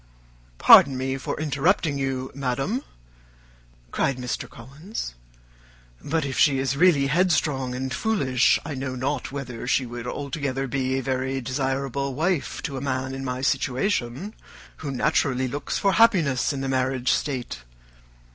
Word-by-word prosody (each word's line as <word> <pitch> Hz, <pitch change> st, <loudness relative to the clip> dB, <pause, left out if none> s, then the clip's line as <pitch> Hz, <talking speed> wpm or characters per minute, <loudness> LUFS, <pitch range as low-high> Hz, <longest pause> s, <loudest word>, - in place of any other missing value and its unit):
"Pardon 135 Hz, -, +8 dB
me 130 Hz, +1 st, -2 dB
for -, -, -4 dB
interrupting 150 Hz, +1 st, +1 dB
you, 130 Hz, -1 st, -2 dB
madam," 135 Hz, -, -2 dB, 1.1 s
cried 135 Hz, -2 st, 0 dB
Mr. 125 Hz, -1 st, -4 dB
Collins; 140 Hz, -, -7 dB, 0.9 s
"but 160 Hz, 0 st, -1 dB
if 135 Hz, -, -3 dB
she 140 Hz, -3 st, +5 dB
is 135 Hz, 0 st, 0 dB
really 160 Hz, -3 st, +4 dB
headstrong 145 Hz, -5 st, +1 dB
and 130 Hz, +1 st, -3 dB
foolish, 135 Hz, -, +2 dB
I 155 Hz, -, -4 dB
know 130 Hz, -1 st, -4 dB
not 135 Hz, +2 st, -2 dB
whether 130 Hz, -4 st, -6 dB
she 130 Hz, 0 st, +2 dB
would 120 Hz, 0 st, -7 dB
altogether 140 Hz, 0 st, -3 dB
be 130 Hz, 0 st, -1 dB
a 135 Hz, -, -2 dB
very 130 Hz, +1 st, -1 dB
desirable 135 Hz, +1 st, -2 dB
wife 165 Hz, +1 st, -1 dB
to 135 Hz, -, -4 dB
a -, -, -4 dB
man 130 Hz, -1 st, -2 dB
in 135 Hz, 0 st, -5 dB
my 125 Hz, -1 st, -3 dB
situation, 135 Hz, -, -1 dB, 0.4 s
who 145 Hz, -, -6 dB
naturally 130 Hz, -1 st, +1 dB
looks 140 Hz, +3 st, -3 dB
for 200 Hz, -, +2 dB
happiness 175 Hz, -, +3 dB
in 140 Hz, -2 st, -4 dB
the 135 Hz, -, -2 dB
marriage 130 Hz, -1 st, 0 dB
state. 130 Hz, -5 st, -2 dB
135 Hz, 145 wpm, -24 LUFS, 130-145 Hz, 1.1 s, Pardon